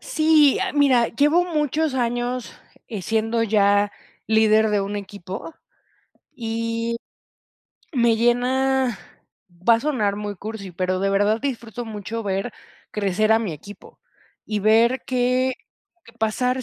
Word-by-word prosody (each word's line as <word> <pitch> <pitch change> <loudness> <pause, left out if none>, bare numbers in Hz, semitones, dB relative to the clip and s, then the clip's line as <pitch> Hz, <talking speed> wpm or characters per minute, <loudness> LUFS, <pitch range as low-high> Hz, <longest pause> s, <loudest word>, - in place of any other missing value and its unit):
Sí, 310 -3 +4
ah, - - -1
mira, 265 -5 +4
llevo 295 +7 +3
muchos 305 -3 -1
años, 245 -3 -2 0.4
eh, 210 -5 -5
siendo 225 +3 0
ya 205 -1 +3 0.3
líder 220 0 +4
de 205 -1 +2
un 200 +1 -3
equipo, 200 - -7 0.8
y 230 0 -2 1.0
me 235 -3 +3
llena, 250 +1 +1 0.7
va 230 - +8
a 230 - 0
sonar 220 -9 0
muy 205 -1 -5
cursi, 205 -1 -7
pero 185 +1 -1
de 195 0 +1
verdad 205 +3 +2
disfruto 240 -3 -4
mucho 220 +1 -5
ver 195 +3 -2 0.4
crecer 210 +1 +1
a 225 - +5
mi 210 -7 -3
equipo, 200 +8 -12 0.5
y 210 -2 -2
ver 230 +5 +3
que 255 0 +1 0.5
que 230 - -17
pasar 250 +3 0
230 Hz, 130 wpm, -22 LUFS, 205-255 Hz, 1.0 s, va